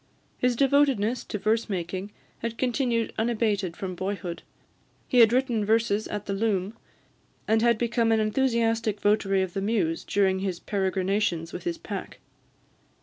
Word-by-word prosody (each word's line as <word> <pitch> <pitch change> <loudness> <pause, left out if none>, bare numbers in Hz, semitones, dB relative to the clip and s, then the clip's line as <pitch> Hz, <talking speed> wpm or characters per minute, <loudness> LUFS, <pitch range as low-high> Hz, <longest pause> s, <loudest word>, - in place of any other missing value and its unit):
His 250 -1 +2
devotedness 265 -4 +2
to - - -4
verse 220 +3 0
making 185 +1 -4 0.3
had 230 0 -4
continued 245 -3 0
unabated 215 -6 0
from 190 -2 -4
boyhood; 185 -1 -4 0.7
he 250 - +3
had 230 -2 +7
written 245 -3 +1
verses 220 0 +1
at 210 -1 -5
the 200 - -2
loom, 200 0 -1 0.7
and 220 +1 +3
had 235 -1 +4
become 235 0 +1
an 220 - +3
enthusiastic 225 -2 +1
votary 195 -2 +2
of 185 -2 -5
the 195 - -2
muse 195 -6 0
during 190 -2 +1
his 190 -3 -3
peregrinations 190 -3 -1
with - - -7
his 340 -1 -2
pack. - - -7
215 Hz, 145 wpm, -26 LUFS, 195-235 Hz, 0.7 s, had